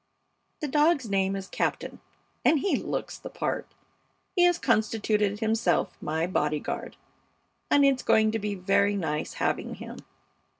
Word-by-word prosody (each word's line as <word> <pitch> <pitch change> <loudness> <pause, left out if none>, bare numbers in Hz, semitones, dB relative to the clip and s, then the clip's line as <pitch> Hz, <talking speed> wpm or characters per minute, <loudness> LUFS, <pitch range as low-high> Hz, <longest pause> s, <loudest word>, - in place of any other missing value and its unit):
The 300 - -1
dog's 295 -2 +2
name 195 0 +1
is 195 0 -5
Captain, - - -2 0.4
and 305 -3 +4
he 400 - +1
looks - - -4
the - - -8
part. - - -3 0.7
He 360 - +3
has 350 -1 +4
constituted 215 - +1
himself 220 -6 +1
my 160 +2 -1
bodyguard, 150 -4 -2 0.7
and 285 -1 +5
it's 270 -2 +3
going 220 0 +3
to 225 - -1
be 205 -1 -3
very 195 +2 +2
nice 155 -5 -2
having - - -1
him. - - -9
210 Hz, 140 wpm, -27 LUFS, 190-260 Hz, 0.7 s, and